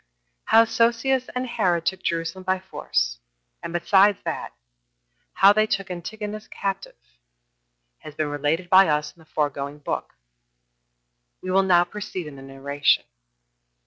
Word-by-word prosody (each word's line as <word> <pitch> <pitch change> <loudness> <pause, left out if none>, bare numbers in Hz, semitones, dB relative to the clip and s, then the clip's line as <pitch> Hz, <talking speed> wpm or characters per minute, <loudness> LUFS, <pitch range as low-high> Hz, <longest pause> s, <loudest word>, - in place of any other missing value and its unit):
1. - - -47 0.4
How 225 +1 +6
Sosius 235 +3 +1
and 250 +1 -1
Herod 185 -9 0
took 190 - -1
Jerusalem 165 +2 -3
by 185 0 +1
force; - - -2 0.4
and - - -6
besides 195 +3 +4
that, - - -4 0.8
how 195 +1 +6
they 215 +1 +2
took 195 -2 -2
Antigonus 210 +4 -6
captive, 195 -1 -4 1.0
has 155 - -11
been 155 -1 -1
related 145 +5 -1
by 190 +1 +7
us 150 0 -1
in - - -26
the 160 - -19
foregoing 145 -1 -2
book. 145 - -5 1.3
We 185 - -3
will 190 +1 +4
now 180 -2 +4
proceed 185 -1 -6
in 150 -2 -9
the - - -11
narration. 135 +1 0
185 Hz, 145 wpm, -24 LUFS, 150-205 Hz, 1.3 s, by